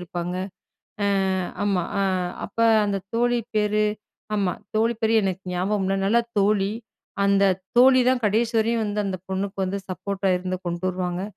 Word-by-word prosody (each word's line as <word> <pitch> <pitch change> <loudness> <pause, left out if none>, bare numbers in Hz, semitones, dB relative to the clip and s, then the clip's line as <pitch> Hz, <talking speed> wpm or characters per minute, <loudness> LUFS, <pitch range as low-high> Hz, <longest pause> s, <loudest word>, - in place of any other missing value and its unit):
இருப்பாங்க. 175 0 -4 0.7
அ, - - +2 0.6
ஆமா, 195 -3 +1 0.2
அ - - +2 0.4
அப்ப - - -11 0.3
அந்த 200 - 0 0.2
தோழி 240 +1 +2 0.2
பேரு 210 0 +2 0.5
ஆமா 195 -3 +1 0.2
தோழி 225 +2 +2
பேரு 220 0 +2
எனக்கு 190 -1 -2
ஞாபகம் 190 +3 0
இல்ல. 195 - +1
நல்ல 230 +4 +4 0.2
தோழி. 200 -1 +2 0.6
அந்த 200 0 +4 0.3
தோழி 255 +1 +7
தான் 255 -1 +2
கடைசி 225 +3 +1
வரையும் 225 +1 +1
வந்து, 210 0 -2
அந்த 190 - -2
பொண்ணுக்கு 190 +1 -3
வந்து 190 +2 -2
சப்போட்டா 195 +1 -2
இருந்து, 185 0 -3
கொண்டு 175 +1 -3
வருவாங்க. 180 0 -2
200 Hz, 155 wpm, -24 LUFS, 185-215 Hz, 0.7 s, தோழி